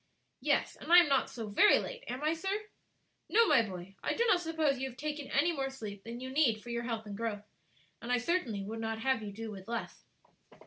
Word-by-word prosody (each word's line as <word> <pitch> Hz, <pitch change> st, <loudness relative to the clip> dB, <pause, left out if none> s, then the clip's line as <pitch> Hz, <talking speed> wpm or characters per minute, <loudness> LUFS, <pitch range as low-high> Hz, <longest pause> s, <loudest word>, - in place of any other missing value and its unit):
"Yes; -, -, +1 dB
and -, -, -7 dB
I 350 Hz, -, +10 dB
am 350 Hz, -, +8 dB
not 270 Hz, -1 st, +2 dB
so 230 Hz, -2 st, -6 dB
very 300 Hz, -, +6 dB
late, -, -, -5 dB
am 255 Hz, +4 st, -4 dB
I, 310 Hz, +1 st, +2 dB
sir?" 330 Hz, +4 st, -4 dB, 0.8 s
"No, 460 Hz, +1 st, +5 dB
my 245 Hz, -, +6 dB
boy, 190 Hz, -3 st, -7 dB
I -, -, -1 dB
do 470 Hz, -, +2 dB
not 380 Hz, -6 st, +4 dB
suppose 320 Hz, -5 st, 0 dB
you 265 Hz, 0 st, -2 dB
have 250 Hz, -, -14 dB
taken 295 Hz, -1 st, -4 dB
any 310 Hz, +5 st, +3 dB
more 270 Hz, -4 st, -2 dB
sleep 210 Hz, -7 st, -8 dB
than 235 Hz, +1 st, -7 dB
you 260 Hz, +1 st, -6 dB
need 255 Hz, -7 st, +2 dB
for 240 Hz, -, -7 dB
your 235 Hz, 0 st, -2 dB
health 225 Hz, -2 st, -3 dB
and 205 Hz, -1 st, -6 dB
growth; 210 Hz, -1 st, -3 dB, 0.6 s
and 235 Hz, -, -4 dB
I 250 Hz, -, +4 dB
certainly 245 Hz, -, -1 dB
would 220 Hz, +3 st, -5 dB
not 225 Hz, 0 st, -2 dB
have 265 Hz, -1 st, +1 dB
you 210 Hz, -1 st, -6 dB
do 220 Hz, +2 st, -6 dB
with 195 Hz, -1 st, -10 dB
less." 235 Hz, 0 st, -5 dB
245 Hz, 235 wpm, -32 LUFS, 220-305 Hz, 0.8 s, I